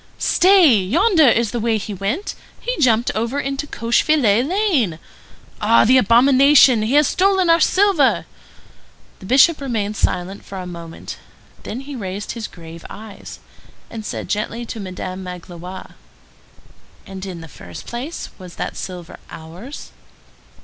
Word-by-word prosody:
"Stay! 355 Hz, -, +5 dB
yonder 320 Hz, -, +3 dB
is 235 Hz, -2 st, +1 dB
the 240 Hz, -, -3 dB
way 225 Hz, 0 st, +1 dB
he 210 Hz, 0 st, -6 dB
went. 200 Hz, -, -3 dB, 0.3 s
He -, -, -3 dB
jumped 235 Hz, -4 st, +3 dB
over 230 Hz, +6 st, -2 dB
into 275 Hz, +1 st, -3 dB
Cochefilet 235 Hz, -2 st, +2 dB
Lane. 325 Hz, -, +1 dB, 0.6 s
Ah, 115 Hz, -, +4 dB
the 255 Hz, +3 st, +6 dB
abomination! 255 Hz, +2 st, +5 dB
He 225 Hz, +6 st, 0 dB
has 295 Hz, -1 st, +5 dB
stolen 375 Hz, -2 st, +2 dB
our 330 Hz, -, +5 dB
silver!" 375 Hz, -9 st, +3 dB, 0.9 s
The 190 Hz, -, -11 dB
Bishop 280 Hz, -, +4 dB
remained 215 Hz, -6 st, -2 dB
silent 190 Hz, 0 st, -2 dB
for 195 Hz, -, -9 dB
a 185 Hz, -, -6 dB
moment; 170 Hz, -2 st, -9 dB, 0.4 s
then 245 Hz, -, -6 dB
he 280 Hz, +1 st, -8 dB
raised 200 Hz, -2 st, -5 dB
his 230 Hz, -3 st, -5 dB
grave 165 Hz, -1 st, -12 dB
eyes, 215 Hz, -1 st, -10 dB, 0.5 s
and 225 Hz, -2 st, -7 dB
said -, -, -5 dB
gently 225 Hz, +3 st, -3 dB
to 225 Hz, -, -7 dB
Madame 185 Hz, -1 st, -6 dB
Magloire:— 180 Hz, 0 st, -9 dB, 1.1 s
"And, 190 Hz, -1 st, -9 dB
in 180 Hz, -3 st, -7 dB
the 165 Hz, -, -10 dB
first 85 Hz, -, -11 dB
place, 255 Hz, +8 st, -6 dB
was 180 Hz, -2 st, -11 dB
that -, -, -5 dB
silver 180 Hz, -3 st, -8 dB
ours?" 175 Hz, -, -10 dB
230 Hz, 145 wpm, -19 LUFS, 190-280 Hz, 1.1 s, the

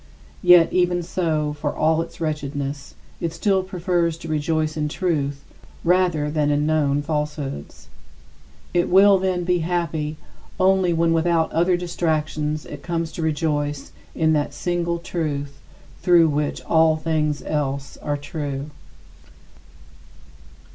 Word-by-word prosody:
Yet 175 Hz, -2 st, +6 dB
even 175 Hz, -1 st, +2 dB
so, 160 Hz, -4 st, -1 dB
for 145 Hz, 0 st, -3 dB
all 160 Hz, +1 st, +2 dB
its -, -, -8 dB
wretchedness, 145 Hz, -2 st, -4 dB, 0.2 s
it 165 Hz, -1 st, -2 dB
still 190 Hz, +3 st, +1 dB
prefers 175 Hz, -3 st, -1 dB
to 165 Hz, -, -9 dB
rejoice 155 Hz, 0 st, 0 dB
in 150 Hz, -1 st, -1 dB
truth 145 Hz, -5 st, -1 dB, 0.4 s
rather 175 Hz, -4 st, +2 dB
than 150 Hz, -1 st, +1 dB
in 145 Hz, 0 st, +1 dB
known 145 Hz, -2 st, +1 dB
falsehoods. 150 Hz, -, -4 dB, 0.9 s
It 175 Hz, -1 st, +2 dB
will, 195 Hz, +1 st, +6 dB
then, 185 Hz, -1 st, 0 dB
be 180 Hz, 0 st, +1 dB
happy 160 Hz, -3 st, -2 dB, 0.4 s
only 190 Hz, -1 st, +3 dB
when 165 Hz, 0 st, +2 dB
without 165 Hz, 0 st, +2 dB
other 175 Hz, +2 st, +2 dB
distractions 155 Hz, -3 st, -2 dB
it 145 Hz, -1 st, -9 dB
comes 165 Hz, -1 st, -2 dB
to 170 Hz, -, -6 dB
rejoice 145 Hz, -2 st, -1 dB, 0.2 s
in 160 Hz, -1 st, +2 dB
that 150 Hz, -1 st, -1 dB
single 170 Hz, -1 st, -1 dB
Truth 150 Hz, -5 st, -4 dB, 0.4 s
through 170 Hz, -3 st, +5 dB
which 145 Hz, 0 st, -2 dB
all 160 Hz, -1 st, +3 dB
things 155 Hz, -2 st, -1 dB
else 140 Hz, -2 st, -2 dB
are 145 Hz, -1 st, -2 dB
true. 145 Hz, -1 st, -5 dB
160 Hz, 125 wpm, -22 LUFS, 150-175 Hz, 0.9 s, Yet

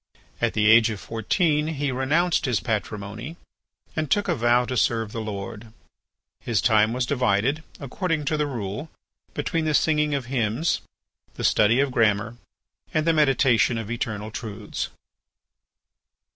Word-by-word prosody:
At 120 Hz, -1 st, +1 dB
the 105 Hz, -1 st, +1 dB
age 110 Hz, +1 st, +6 dB
of 105 Hz, -2 st, -4 dB
fourteen 150 Hz, -, 0 dB
he 145 Hz, -3 st, -2 dB
renounced 150 Hz, +8 st, +1 dB
his 125 Hz, -5 st, +1 dB
patrimony 110 Hz, -, -4 dB, 0.6 s
and 155 Hz, -1 st, -2 dB
took 205 Hz, -1 st, +2 dB
a 175 Hz, -, +2 dB
vow 120 Hz, -2 st, +3 dB
to 130 Hz, -, -3 dB
serve 115 Hz, -3 st, +1 dB
the 115 Hz, -, -4 dB
Lord. 105 Hz, +1 st, -6 dB, 0.7 s
His 115 Hz, -3 st, -1 dB
time 110 Hz, -2 st, +3 dB
was 125 Hz, +1 st, -1 dB
divided, 125 Hz, +2 st, +1 dB, 0.2 s
according 155 Hz, +2 st, -2 dB
to 155 Hz, +2 st, 0 dB
the 150 Hz, -1 st, 0 dB
rule, 115 Hz, +3 st, -5 dB, 0.5 s
between 165 Hz, -1 st, -1 dB
the 155 Hz, -1 st, +1 dB
singing 150 Hz, -2 st, +2 dB
of 135 Hz, -3 st, -3 dB
hymns, 120 Hz, +4 st, 0 dB, 0.5 s
the -, -, -6 dB
study 110 Hz, +4 st, +4 dB
of 140 Hz, -1 st, +2 dB
grammar, 115 Hz, 0 st, +1 dB, 0.5 s
and 155 Hz, 0 st, 0 dB
the 165 Hz, -, +3 dB
meditation 135 Hz, -6 st, +3 dB
of 115 Hz, 0 st, -5 dB
eternal 110 Hz, -2 st, -3 dB
truths. 110 Hz, -3 st, -5 dB
120 Hz, 145 wpm, -24 LUFS, 110-150 Hz, 0.7 s, age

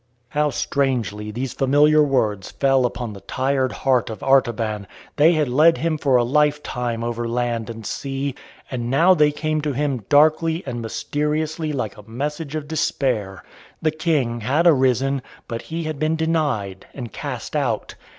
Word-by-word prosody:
'" 120 Hz, 0 st, -43 dB
How 150 Hz, 0 st, +1 dB
strangely 120 Hz, -6 st, -1 dB
these 120 Hz, +4 st, -4 dB
familiar 145 Hz, +3 st, +4 dB
words 110 Hz, -9 st, +1 dB
fell 135 Hz, -2 st, +2 dB
upon 120 Hz, -2 st, -5 dB
the 100 Hz, -, -11 dB
tired 130 Hz, +5 st, 0 dB
heart 130 Hz, -4 st, +1 dB
of 110 Hz, -, -7 dB
Artaban! 115 Hz, -6 st, +1 dB, 0.3 s
They 155 Hz, +3 st, +6 dB
had 155 Hz, -3 st, +1 dB
led 155 Hz, +7 st, +5 dB
him 160 Hz, -1 st, -1 dB
for 135 Hz, -3 st, +2 dB
a 120 Hz, -, +5 dB
lifetime 125 Hz, -4 st, 0 dB
over 120 Hz, 0 st, -2 dB
land 120 Hz, -1 st, -1 dB
and 115 Hz, -1 st, -8 dB
sea. 135 Hz, +4 st, -3 dB, 0.4 s
And 120 Hz, -2 st, -3 dB
now 165 Hz, +8 st, +5 dB
they 150 Hz, -4 st, +4 dB
came 155 Hz, +1 st, -1 dB
to 150 Hz, -1 st, -2 dB
him 135 Hz, -4 st, -1 dB
darkly 160 Hz, +3 st, +4 dB
and 120 Hz, -3 st, -4 dB
mysteriously 150 Hz, +7 st, -2 dB
like 125 Hz, -8 st, -3 dB
a 105 Hz, +1 st, -14 dB
message 150 Hz, +5 st, -4 dB
of 150 Hz, -2 st, -4 dB
despair. 115 Hz, -, -1 dB, 0.4 s
The 155 Hz, -, +1 dB
King 150 Hz, -7 st, 0 dB
had 140 Hz, +10 st, +1 dB
arisen, 135 Hz, -3 st, +3 dB, 0.3 s
but 115 Hz, 0 st, -4 dB
he 165 Hz, +1 st, -3 dB
had 155 Hz, -2 st, -4 dB
been 155 Hz, +1 st, +1 dB
denied 145 Hz, -, -1 dB
and 120 Hz, -6 st, -7 dB
cast -, -, -5 dB
out. -, -, -1 dB
135 Hz, 165 wpm, -22 LUFS, 120-150 Hz, 0.4 s, They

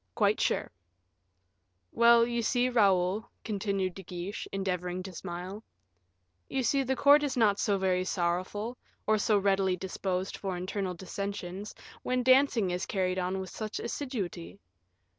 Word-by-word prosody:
"Quite -, -, +2 dB
sure." -, -, 0 dB, 1.2 s
"Well, 235 Hz, 0 st, +6 dB
you 235 Hz, 0 st, -1 dB
see, 245 Hz, +2 st, +2 dB
Raoul," 200 Hz, -3 st, +2 dB
continued 195 Hz, -3 st, -1 dB
De 195 Hz, -, -9 dB
Guiche, 180 Hz, +2 st, -6 dB
endeavoring 185 Hz, -2 st, -2 dB
to 190 Hz, 0 st, -8 dB
smile, 180 Hz, +4 st, -6 dB, 0.9 s
"you 265 Hz, -, -1 dB
see, 275 Hz, +3 st, +2 dB
the 265 Hz, 0 st, 0 dB
court 285 Hz, +2 st, +6 dB
is 285 Hz, -3 st, -1 dB
not 205 Hz, -3 st, +3 dB
so 200 Hz, -1 st, +2 dB
very 185 Hz, -1 st, +1 dB
sorrowful, 185 Hz, +6 st, -2 dB, 0.3 s
or 215 Hz, 0 st, +3 dB
so 210 Hz, 0 st, +3 dB
readily 195 Hz, -1 st, +2 dB
disposed 190 Hz, 0 st, -3 dB
for 190 Hz, -3 st, -3 dB
internal 185 Hz, 0 st, -3 dB
dissensions, 195 Hz, +1 st, -5 dB, 0.3 s
when 250 Hz, 0 st, 0 dB
dancing 255 Hz, -6 st, +4 dB
is 180 Hz, +1 st, -2 dB
carried 185 Hz, -2 st, 0 dB
on 185 Hz, +1 st, -1 dB
with 190 Hz, -1 st, -6 dB
such 215 Hz, -1 st, -5 dB
assiduity. 195 Hz, -, -4 dB
195 Hz, 140 wpm, -30 LUFS, 185-230 Hz, 1.2 s, Well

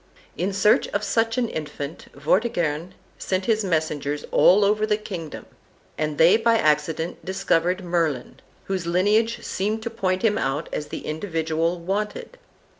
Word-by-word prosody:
In 185 Hz, +3 st, -1 dB
search 200 Hz, +2 st, +3 dB
of 205 Hz, -, -2 dB
such 225 Hz, +1 st, +1 dB
an 245 Hz, -2 st, +1 dB
infant, 150 Hz, -3 st, -6 dB
Vortigern 170 Hz, -, 0 dB, 0.2 s
sent 185 Hz, 0 st, -1 dB
his 220 Hz, -2 st, +2 dB
messengers 155 Hz, -5 st, -1 dB
all 200 Hz, +3 st, +5 dB
over 210 Hz, +1 st, +2 dB
the 215 Hz, -1 st, +2 dB
kingdom, 180 Hz, -7 st, -7 dB, 0.5 s
and 155 Hz, -1 st, -2 dB
they 170 Hz, +6 st, +6 dB
by 230 Hz, 0 st, +3 dB
accident 155 Hz, 0 st, 0 dB
discovered 180 Hz, 0 st, 0 dB
Merlin, 165 Hz, -7 st, -1 dB, 0.2 s
whose 185 Hz, -3 st, -3 dB
lineage 210 Hz, +6 st, +2 dB
seemed 215 Hz, +3 st, -2 dB
to 235 Hz, -, -4 dB
point 190 Hz, -4 st, -1 dB
him 215 Hz, -2 st, +2 dB
out 140 Hz, +4 st, -2 dB
as 150 Hz, -, -3 dB
the -, -, -7 dB
individual 165 Hz, 0 st, -1 dB
wanted. 210 Hz, -, -4 dB
180 Hz, 145 wpm, -24 LUFS, 160-210 Hz, 0.5 s, they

